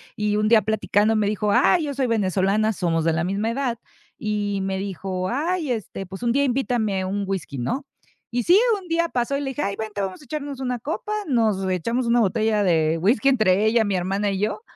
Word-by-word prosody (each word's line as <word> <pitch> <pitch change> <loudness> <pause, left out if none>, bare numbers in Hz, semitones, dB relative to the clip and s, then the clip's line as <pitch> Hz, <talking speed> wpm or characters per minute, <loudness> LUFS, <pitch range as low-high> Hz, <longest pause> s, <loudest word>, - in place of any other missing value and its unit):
y 210 0 0
un 215 0 +1
día 220 0 +6
platicando 215 0 +1
me 210 -1 +1
dijo: 210 0 0
"¡Ay!, 295 - +4
yo 290 -2 -3
soy 270 -1 0
venezolana", 205 0 +1
somos 170 -5 0
de 165 - +2
la 170 +1 0
misma 200 +4 -1
edad 245 -1 -1 0.4
y 205 -2 -2
me 190 0 -2
dijo: 190 -1 -3
"¡Ay!, 310 +3 -1
este, 215 -4 -4
pues, 190 +4 -9
un 235 - +2
día 280 +3 +2
invítame 240 -7 0
un 200 +2 -2
whisky", 185 -8 -4
¿no? 250 - -2 0.5
Y 240 +1 0
sí, 360 - +6 0.2
un 360 - -14
día 335 +1 +1
pasó 250 +1 -1
y - - -3
le 270 -2 -3
dije: 290 - -4
"¡Ay, 200 0 -1
vente! 215 -2 -4
Vamos 190 +6 -4
a - - -15
echarnos 285 0 -5
una 250 -2 -2
copa". 325 - -4
Nos 220 -8 +1
echamos 230 +8 -1
una 235 +1 +3
botella 215 0 +1
de 160 -3 +2
whisky 215 +10 +3
entre 215 -6 +3
ella, 220 0 +3
mi 200 -2 0
hermana 195 +3 0
y 195 - -2
yo. 210 - -1
215 Hz, 220 wpm, -23 LUFS, 195-250 Hz, 0.5 s, día